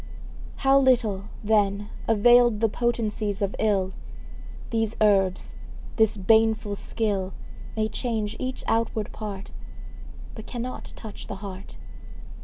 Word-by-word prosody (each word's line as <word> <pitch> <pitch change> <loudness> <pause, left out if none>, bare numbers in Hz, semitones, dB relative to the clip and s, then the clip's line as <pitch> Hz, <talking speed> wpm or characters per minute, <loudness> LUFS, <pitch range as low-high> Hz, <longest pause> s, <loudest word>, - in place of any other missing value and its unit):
How 270 +1 +6
little, 235 -7 +2 0.2
then, 205 -1 +1 0.2
availed 240 +1 +5
The 225 0 +2
potencies 215 -3 -1
of 200 - -1
ill! 195 -3 +1 0.8
These 225 -1 0
herbs, 195 -3 +2 0.4
this 220 -2 +3
baneful 220 +1 +3
skill, 200 -3 -1 0.4
May 215 0 +1
change 220 -3 -2
each 255 0 -4
outward 225 -2 0
part, 200 -3 -7 0.8
But 220 - -9
cannot 250 +1 -6
touch 215 -3 -9
the - - -5
heart. 190 -1 -8
215 Hz, 110 wpm, -25 LUFS, 200-230 Hz, 0.8 s, How